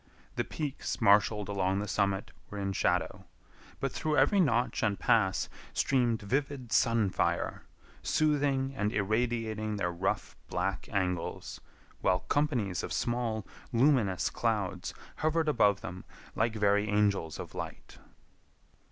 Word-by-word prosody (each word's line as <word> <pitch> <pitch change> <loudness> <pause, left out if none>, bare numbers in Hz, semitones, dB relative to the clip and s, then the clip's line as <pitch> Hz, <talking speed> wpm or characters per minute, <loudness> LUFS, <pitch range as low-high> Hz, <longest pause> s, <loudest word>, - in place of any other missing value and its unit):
The - - 0
peaks 150 -3 -4
marshaled 105 0 +4
along 95 -1 0
the 105 +1 -2
summit 100 -1 0 0.2
were 105 - -7
in 100 -1 -2
shadow, - - 0 0.5
but - - -1
through 155 -1 -1
every 145 +10 +4
notch 125 -8 +2
and 105 -3 +1
pass 95 -4 +2 0.3
streamed 120 -5 +1
vivid 135 +1 -2
sun 115 -5 +3
fire, - - -1 0.3
soothing 140 -3 +1
and 105 -3 0
irradiating 110 0 -1
their 90 -4 -1
rough, 90 +3 -2
black 95 +2 -2
angles, 90 -4 -2 0.4
while 90 0 +2
companies 120 - 0
of - - -5
small, 120 -3 -1 0.3
luminous 120 -7 +3
clouds 100 -5 -1 0.2
hovered 160 +1 +1
above 100 -9 +3
them 90 +3 -7 0.3
like 115 0 +1
very 105 0 +2
angels 100 -6 +1
of - - -7
light. - - -7
105 Hz, 125 wpm, -30 LUFS, 100-125 Hz, 0.5 s, marshaled